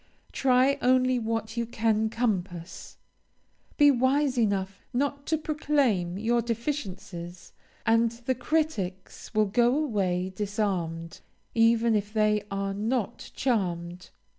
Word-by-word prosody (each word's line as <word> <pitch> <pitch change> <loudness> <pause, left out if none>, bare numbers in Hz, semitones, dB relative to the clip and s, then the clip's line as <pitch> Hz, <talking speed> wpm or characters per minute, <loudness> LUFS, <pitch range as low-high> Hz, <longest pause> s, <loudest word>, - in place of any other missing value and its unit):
Try 265 +1 +3
only 255 0 +3
what 225 -1 -3
you 235 -1 -1
can 220 -1 +1
compass. 185 -7 -3 0.8
Be 290 -1 +7
wise 270 +2 +2
enough 200 -4 -1
not 280 +2 -1
to 315 - +2
proclaim 280 - 0
your 235 +3 +1
deficiencies, 200 - -5 0.3
and 230 0 +4
the 240 +2 -2
critics 245 - -2
will 215 0 +4
go 240 +6 +2
away 190 -10 -1
disarmed, 185 -6 -2 0.3
even 230 0 +4
if 205 0 -1
they 215 -1 +2
are 195 0 -2
not 230 +3 -2
charmed. 180 -7 -2
225 Hz, 115 wpm, -27 LUFS, 195-255 Hz, 0.8 s, Be